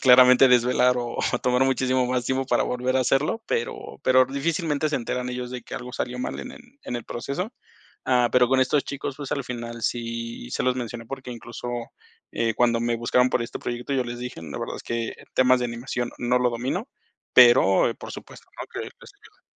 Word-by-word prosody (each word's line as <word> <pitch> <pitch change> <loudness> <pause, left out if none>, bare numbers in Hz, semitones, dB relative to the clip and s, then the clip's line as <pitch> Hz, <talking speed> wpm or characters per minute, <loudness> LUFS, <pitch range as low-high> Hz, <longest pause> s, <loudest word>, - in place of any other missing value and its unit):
claramente 125 +1 +7
desvelar, 125 0 +4
o, 120 -1 -4 0.3
tomar 125 +1 +3
muchísimo 130 -1 +1
más 125 -1 -1
tiempo 130 +1 0
para - - +2
volver 125 +1 -1
a - - +3
hacerlo, 140 - +1
pero 465 - -3
pero 130 0 +5
difícilmente 150 +2 -1
se 150 - 0
enteran 125 +1 -3
ellos 125 0 -5
de 125 -1 -6
que - - -9
algo 125 0 -6
salió 125 0 -3
mal - - -3
en 255 - -8
el - - -12 0.2
en 125 - -3
el 120 - -6
proceso, 140 - -4 0.5
ah, 125 -2 +3
pero 125 -1 +5
con 130 +1 +3
estos 135 +2 +2
chicos, 140 -1 -5
pues, 145 -2 -5
al 140 - -1
final 120 -1 -6
sí 115 - -3
se - - -1
los 130 0 +1
mencioné 120 -2 -5
porque 130 -1 -7
incluso, 120 +1 -8 0.6
eh, 115 -1 0
cuando 120 0 +3
me 120 0 0
buscaron 125 +2 +2
por 120 - +1
este 115 - -6
proyecto 120 +3 -4
yo 130 -2 +1
les 120 0 -6
dije: 125 -7 -6
"La 75 -4 -6
verdad - - -4
es - - -9
que 115 -1 -3 0.2
temas 130 0 +5
de 125 - 0
animación 120 +1 -4
no 125 +1 +2
lo 125 -1 +2
domino", 130 - -3 0.5
pero 120 -6 +6
por - - -8
supuesto, - - -11
¿no?, - - -5
que - - -5
les - - -7 0.2
ayudo. - - -22
125 Hz, 210 wpm, -25 LUFS, 120-130 Hz, 0.6 s, claramente